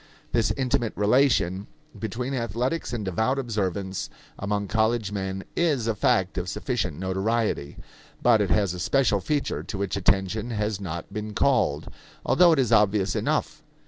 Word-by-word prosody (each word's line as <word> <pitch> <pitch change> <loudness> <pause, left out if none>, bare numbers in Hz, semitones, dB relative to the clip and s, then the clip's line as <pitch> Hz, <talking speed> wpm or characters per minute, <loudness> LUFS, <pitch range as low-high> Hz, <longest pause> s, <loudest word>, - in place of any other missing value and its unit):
This 115 -2 +2
intimate 125 -3 0
relation 105 -4 +2 0.3
between 120 +5 -3
athletics 125 - -2
and 115 -4 -3
devout 110 +8 0
observance 100 -6 -2 0.3
among 100 0 -1
college 110 -1 +1
men 95 -1 -3
is 150 -9 +1
a 115 - +1
fact 100 -6 +1
of 90 0 -4
sufficient 75 - -2
notoriety; 95 -4 -1 0.4
but 115 -3 +4
it 100 - 0
has 100 -4 +2
a 90 - -6
special 120 +1 +2
feature 145 +8 -1
to 105 - -6
which 100 0 -2
attention 100 +4 +1
has 105 -2 -2
not 85 0 -6
been 105 0 -5
called, - - +2 0.4
although 175 -1 +5
it 160 - +3
is 130 -5 +1
obvious 105 -1 +3
enough. - - -1
105 Hz, 150 wpm, -25 LUFS, 95-120 Hz, 0.4 s, although